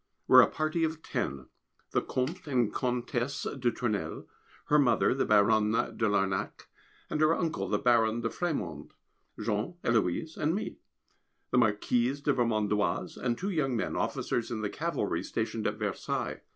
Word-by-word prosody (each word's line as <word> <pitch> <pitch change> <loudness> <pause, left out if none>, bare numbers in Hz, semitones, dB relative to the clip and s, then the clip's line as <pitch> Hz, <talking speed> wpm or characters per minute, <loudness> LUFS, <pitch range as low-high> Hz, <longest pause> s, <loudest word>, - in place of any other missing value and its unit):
We - - +5
are - - +12
a - - +5
party 155 +2 -1
of 160 0 -2
ten. 70 -2 -3 0.5
The - - +2
Comte 155 +8 -3
and 125 -6 +1
Comtesse 125 +1 -2 0.2
de 125 -1 +2
Tournelle; 115 -4 -3 0.4
her 150 - +4
mother, 135 -3 +3
the 135 - 0
Baronne 105 0 +4 0.3
de 110 - +1
Larnac, 95 0 -1 0.5
and 150 - 0
her 155 +2 +5
uncle, 165 -3 -2
the - - +2
Baron 120 -3 +3
de 115 - -1
Frémond, 95 - -3 0.5
Jean, 105 +9 -2
Héloise, 115 - 0
and 155 +4 +1
me; 215 - -4 0.7
the 125 - +4
Marquise 120 +4 +1
de 145 0 +1
Vermondoise, 110 -4 0
and 120 -2 -1
two 195 +3 -2
young 135 -8 0
men, - - -2
officers 120 - -1
in 110 -2 -3
the 105 - -2
Cavalry, - - -1
stationed - - -2
at - - -1
Versailles. - - -3
120 Hz, 160 wpm, -30 LUFS, 110-150 Hz, 0.7 s, are